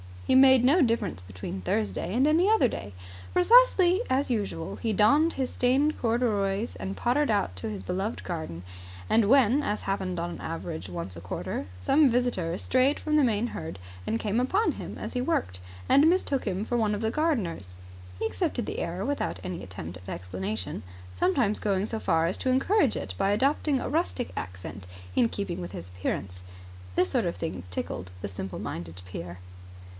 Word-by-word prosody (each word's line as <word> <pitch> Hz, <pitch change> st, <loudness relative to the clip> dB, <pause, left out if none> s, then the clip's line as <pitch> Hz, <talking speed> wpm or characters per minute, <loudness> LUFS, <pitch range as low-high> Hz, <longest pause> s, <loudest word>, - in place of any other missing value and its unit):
He -, -, +2 dB
made 260 Hz, -1 st, +7 dB
no 295 Hz, +8 st, +5 dB
difference 230 Hz, -, +1 dB
between 95 Hz, +1 st, -7 dB
Thursday 105 Hz, -, -1 dB
and 260 Hz, +3 st, +4 dB
any 330 Hz, +6 st, +4 dB
other 435 Hz, -, +4 dB
day. 100 Hz, -, -6 dB, 0.4 s
Precisely 375 Hz, -1 st, +6 dB
as 265 Hz, 0 st, +1 dB
usual 200 Hz, -7 st, -2 dB
he 225 Hz, -2 st, -1 dB
donned 290 Hz, -, +4 dB
his 260 Hz, -2 st, -2 dB
stained 275 Hz, +5 st, +2 dB
corduroys 225 Hz, -3 st, 0 dB
and 195 Hz, +1 st, -4 dB
pottered 270 Hz, +4 st, +1 dB
about 95 Hz, -, 0 dB
his 100 Hz, 0 st, -5 dB
beloved 195 Hz, -, -3 dB
garden; 160 Hz, -, -5 dB, 0.5 s
and 220 Hz, -2 st, +4 dB
when, 265 Hz, +1 st, +5 dB
as 210 Hz, -7 st, -2 dB
happened 190 Hz, -2 st, -2 dB
on 170 Hz, -, -2 dB
an -, -, -7 dB
average 95 Hz, -, -5 dB
once 90 Hz, 0 st, -6 dB
a -, -, -8 dB
quarter, 90 Hz, +1 st, -4 dB, 0.2 s
some 285 Hz, -, +5 dB
visitor, 230 Hz, -9 st, 0 dB
strayed 260 Hz, +6 st, +2 dB
from 305 Hz, -1 st, 0 dB
the 290 Hz, -, +5 dB
main 225 Hz, 0 st, +1 dB
herd, 160 Hz, -, -6 dB, 0.4 s
came 215 Hz, +1 st, 0 dB
upon 380 Hz, -, +2 dB
him -, -, -7 dB
as -, -, -6 dB
he 250 Hz, -, 0 dB
worked 95 Hz, -, -1 dB, 0.3 s
and 295 Hz, +3 st, +6 dB
mistook 310 Hz, -7 st, +1 dB
him 195 Hz, -1 st, -1 dB
for 240 Hz, -, 0 dB
one 215 Hz, -2 st, +1 dB
of 205 Hz, -, -4 dB
the 220 Hz, 0 st, 0 dB
gardeners, 205 Hz, -, -1 dB, 0.4 s
he -, -, -2 dB
accepted 255 Hz, -, -1 dB
the -, -, -4 dB
error 175 Hz, +3 st, -3 dB
without 285 Hz, +2 st, -2 dB
any 180 Hz, -2 st, -4 dB
attempt 90 Hz, -2 st, -7 dB
at 90 Hz, +1 st, -12 dB
explanation, 95 Hz, +2 st, -4 dB, 0.3 s
sometimes 200 Hz, -, +1 dB
going 200 Hz, -1 st, 0 dB
so 220 Hz, 0 st, -3 dB
far 165 Hz, -4 st, +2 dB
as 170 Hz, -, 0 dB
to 260 Hz, -, -1 dB
encourage 270 Hz, -, +3 dB
it 95 Hz, -, -4 dB
by 195 Hz, -, +2 dB
adopting 275 Hz, +5 st, +2 dB
a -, -, -3 dB
rustic 305 Hz, -5 st, -1 dB
accent 90 Hz, +1 st, -6 dB, 0.3 s
in 235 Hz, -, +4 dB
keeping 200 Hz, -5 st, -4 dB
with 90 Hz, +2 st, -7 dB
his 90 Hz, -1 st, -7 dB
appearance. 90 Hz, 0 st, -4 dB, 0.5 s
This 185 Hz, -, +3 dB
sort 245 Hz, -6 st, +1 dB
of 170 Hz, -, -1 dB
thing 160 Hz, -, -4 dB
tickled 90 Hz, 0 st, -4 dB
the -, -, -4 dB
simple 95 Hz, 0 st, -6 dB
minded 85 Hz, +1 st, -6 dB
peer. 90 Hz, -1 st, -7 dB
205 Hz, 180 wpm, -27 LUFS, -, 0.5 s, made